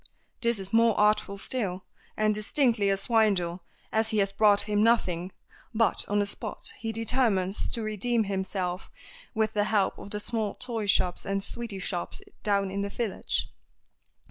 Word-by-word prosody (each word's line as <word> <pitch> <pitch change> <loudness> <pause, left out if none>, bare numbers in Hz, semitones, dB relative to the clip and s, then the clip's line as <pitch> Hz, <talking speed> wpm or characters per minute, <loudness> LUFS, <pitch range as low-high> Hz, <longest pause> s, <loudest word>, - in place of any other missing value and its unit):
This 235 -1 +2
is 195 +1 -7
more 230 -1 +4
artful 210 -1 +2
still, 195 -4 -2 0.3
and 215 0 +3
distinctly 215 -1 +2
a 195 - +2
swindle, 195 -5 +1 0.3
as 220 0 +2
he 220 - 0
has 195 -1 +2
brought 205 -1 +4
him 205 0 0
nothing, 190 -6 +2 0.4
but 225 0 +2
on 205 - 0
the 205 - +3
spot 200 - -6
he 225 0 -3
determines 220 -4 +1
to 230 - -2
redeem 220 +2 0
himself 190 -2 -3 0.5
with 220 -1 +1
the 205 -1 +2
help 205 -3 +1
of - - -9
the 210 - -3
small 215 -1 -2
toy 230 -4 -4
shops 180 -2 +2
and 195 0 -1
sweety 230 -3 -5
shops 185 - -3 0.2
down 200 -2 +1
in 200 +1 -2
the 200 - -2
village. 220 -1 -2
205 Hz, 165 wpm, -28 LUFS, 195-225 Hz, 0.5 s, more